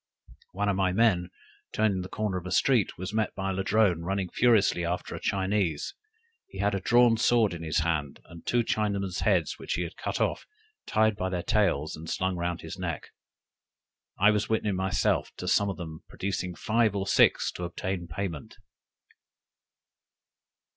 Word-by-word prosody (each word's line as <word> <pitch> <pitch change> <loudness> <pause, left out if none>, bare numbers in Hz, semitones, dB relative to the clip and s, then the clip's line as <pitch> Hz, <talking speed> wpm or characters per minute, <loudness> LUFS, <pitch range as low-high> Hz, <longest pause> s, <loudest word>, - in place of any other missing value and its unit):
One 105 +2 -1
of 100 - +2
my 95 -1 +1
men 95 -4 +2 0.4
turning 105 -4 +1
the 90 - -7
corner 105 -3 -2
of 90 - -9
a - - -6
street 125 -8 +2
was 95 +3 -5
met 110 -1 0
by 95 0 -2
a - - -2
Ladrone 95 -2 +2
running 95 +1 -2
furiously 110 -7 +3
after 85 +1 -3
a - - -5
Chinese; 95 -5 -1 0.5
he - - -12
had 100 +1 +1
a 100 - 0
drawn 120 +3 +4
sword 115 -3 +3
in 85 - -6
his 80 0 0
hand, 75 -4 -1
and 85 0 -13
two 120 -1 +1
Chinaman's 100 -4 -1
heads 90 -7 +1
which - - -3
he 90 - -1
had 85 - -7
cut - - -3
off, - - -1 0.4
tied 110 0 +2
by 95 -1 -2
their 90 -2 -2
tails, 90 -8 +1
and 80 +1 -9
slung 95 0 -1
round 85 0 -2
his 80 +3 -8
neck. 85 -3 -4 1.1
I 105 +2 +5
was 105 -1 0
witness 110 -2 +1
myself 95 0 0
to - - -6
some 100 0 +3
of 95 - -4
them 80 -2 -8
producing 90 -2 -3
five 110 +2 +1
or 95 -1 -1
six - - +4
to 90 - -7
obtain 90 +1 -4
payment! 85 -3 -5
95 Hz, 175 wpm, -28 LUFS, 85-105 Hz, 1.1 s, I